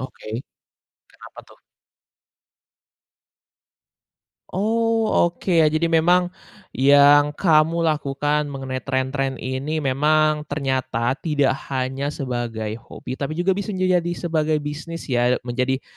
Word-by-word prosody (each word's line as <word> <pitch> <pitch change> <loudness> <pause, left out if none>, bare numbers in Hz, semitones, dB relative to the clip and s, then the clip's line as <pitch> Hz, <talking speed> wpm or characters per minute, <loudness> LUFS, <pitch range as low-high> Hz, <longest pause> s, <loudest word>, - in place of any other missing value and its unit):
Oke. 130 -4 -9 0.8
Kenapa - - -13
tuh? - - -19 3.0
Oh, 225 +2 +1 0.2
oke. 175 0 -1
Ya 160 - +6
jadi 155 +2 +1
memang, 175 +2 +3 0.4
yang 145 +2 +5
kamu 165 0 +3
lakukan 150 -1 0
mengenai 135 -2 -5
tren-tren 135 0 -1
ini 140 +5 -3
memang 150 +2 +2
ternyata 130 -3 -1
tidak 145 -4 +1 0.2
hanya 135 +2 -3
sebagai 115 -4 -4
hobi, 125 +2 -9
tapi 145 +2 -3
juga 175 +3 0
bisa 200 0 -4
menjadi 185 -1 +2
jadi 175 0 -3
sebagai 160 -3 0
bisnis 160 +3 -6
ya? 125 0 +2
Menjadi 130 +2 -1
145 Hz, 110 wpm, -22 LUFS, 130-165 Hz, 3.0 s, Ya